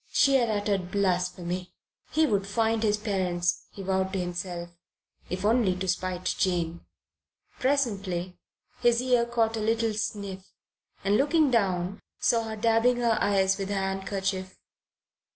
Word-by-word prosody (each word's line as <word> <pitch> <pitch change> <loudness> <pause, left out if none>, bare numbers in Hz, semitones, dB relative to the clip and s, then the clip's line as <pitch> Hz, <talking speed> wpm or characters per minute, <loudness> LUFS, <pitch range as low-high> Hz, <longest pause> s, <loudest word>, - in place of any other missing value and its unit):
She 275 - +4
had 240 -3 +1
uttered 205 -3 0
blasphemy. 180 -2 -1 0.3
He 315 +1 +3
would 200 -7 0
find 225 +2 +1
his 210 -2 +2
parents, 180 -4 -1
he 195 - -9
vowed 190 0 0
to 195 - 0
himself, 175 -1 -4 0.6
if 185 +2 -3
only 220 -4 +3
to 185 +1 -4
spite 185 0 -2
Jane. 170 -2 0 0.8
Presently 200 -10 -1 0.4
his 240 -1 +3
ear 245 -2 +2
caught 225 -1 +1
a - - -2
little 225 +1 +1
sniff, 200 -2 -4 0.5
and 200 +1 +3
looking 295 +1 +3
down, 195 -4 0 0.2
saw 230 -2 +2
her 220 0 -4
dabbing 230 +3 +3
her 235 -2 +2
eyes 195 -1 +2
with 195 0 -3
her 205 - -1
handkerchief. 190 -1 -2
200 Hz, 140 wpm, -27 LUFS, 185-225 Hz, 0.8 s, She